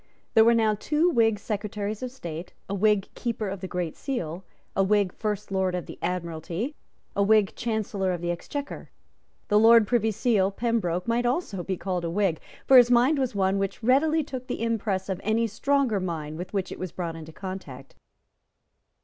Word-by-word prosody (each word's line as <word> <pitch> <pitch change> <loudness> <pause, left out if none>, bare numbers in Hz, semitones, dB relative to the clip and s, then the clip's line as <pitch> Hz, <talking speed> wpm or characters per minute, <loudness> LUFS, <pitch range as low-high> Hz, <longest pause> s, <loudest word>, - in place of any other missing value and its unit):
There 225 - +7
were 235 +1 +5
now 220 -2 +3
two 300 - +1
Whig 225 -6 +3
Secretaries 210 0 -4
of 255 - -3
State, 175 -9 -7
a 195 - -4
Whig 210 0 +2
Keeper 230 -3 -3
of 195 -1 -5
the 190 - -4
Great 180 -3 -3
Seal, 185 - -4 0.3
a 195 - +3
Whig 200 -1 +2
First 210 -2 -3
Lord 190 -1 +1
of 180 - -3
the - - -10
Admiralty, 175 - -3 0.4
a 200 - +1
Whig 205 -1 +3
Chancellor 210 -4 -1
of 175 - -2
the 175 +1 -1
Exchequer. 285 +11 -6 0.6
The 210 - +5
Lord 225 0 +7
Privy 230 -3 +2
Seal, 210 -2 +2
Pembroke, 200 -5 -1
might 240 +1 +1
also 245 - -1
be 190 +1 -3
called 180 -2 -2
a 170 - -1
Whig; 185 -2 +1 0.3
for 265 - +7
his 245 -1 +8
mind 250 +5 +4
was 255 -5 -1
one 195 0 +2
which 195 +3 -3
readily 305 +6 +3
took 260 -3 -7
the - - -3
impress 210 -4 -1
of 190 -2 -3
any 220 +3 +2
stronger 250 0 +1
mind 160 -4 -4
with 180 +3 -6
which 195 -2 -2
it - - -7
was 185 -2 -4
brought 170 -2 -4
into 160 0 -9
contact. 185 -8 -8
205 Hz, 190 wpm, -26 LUFS, 185-230 Hz, 0.6 s, his